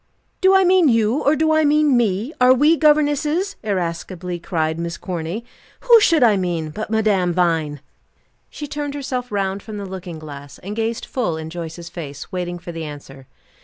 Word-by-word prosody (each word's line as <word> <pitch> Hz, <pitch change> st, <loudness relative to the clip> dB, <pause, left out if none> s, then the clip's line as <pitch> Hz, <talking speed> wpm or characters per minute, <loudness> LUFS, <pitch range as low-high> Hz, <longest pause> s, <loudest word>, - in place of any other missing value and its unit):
"Do 380 Hz, 0 st, +5 dB
I 385 Hz, -, +6 dB
mean 365 Hz, -2 st, +5 dB
you, 230 Hz, +4 st, +2 dB
or 290 Hz, -, +3 dB
do 315 Hz, +1 st, +2 dB
I 315 Hz, 0 st, +3 dB
mean 300 Hz, -2 st, +3 dB
me? 225 Hz, -, 0 dB
Are 255 Hz, +1 st, +7 dB
we 300 Hz, +5 st, +4 dB
governesses?" 305 Hz, +4 st, +2 dB
irascibly 180 Hz, -2 st, -3 dB
cried 160 Hz, -1 st, -2 dB
Miss 170 Hz, 0 st, -4 dB
Corny. 180 Hz, +5 st, -5 dB, 0.4 s
"Who 475 Hz, -2 st, +7 dB
should 330 Hz, -, +4 dB
I 215 Hz, -4 st, +5 dB
mean, 170 Hz, -4 st, -2 dB
but 215 Hz, +7 st, -5 dB
Madame 205 Hz, -5 st, +1 dB
Vine?" 160 Hz, -5 st, 0 dB, 0.7 s
She 295 Hz, -, -7 dB
turned 290 Hz, 0 st, -4 dB
herself 255 Hz, -4 st, -4 dB
round 195 Hz, -1 st, -1 dB
from 215 Hz, 0 st, -8 dB
the 200 Hz, -, -5 dB
looking 185 Hz, -3 st, -7 dB
glass, 145 Hz, -2 st, -10 dB
and 200 Hz, +3 st, -7 dB
gazed 225 Hz, 0 st, -2 dB
full 215 Hz, -11 st, -2 dB
in 160 Hz, 0 st, -7 dB
Joyce's 170 Hz, 0 st, -7 dB
face, 145 Hz, -4 st, -8 dB
waiting 175 Hz, -1 st, -3 dB
for 175 Hz, 0 st, -8 dB
the 165 Hz, -1 st, -6 dB
answer. 140 Hz, -3 st, -10 dB
200 Hz, 180 wpm, -20 LUFS, -, 0.7 s, Are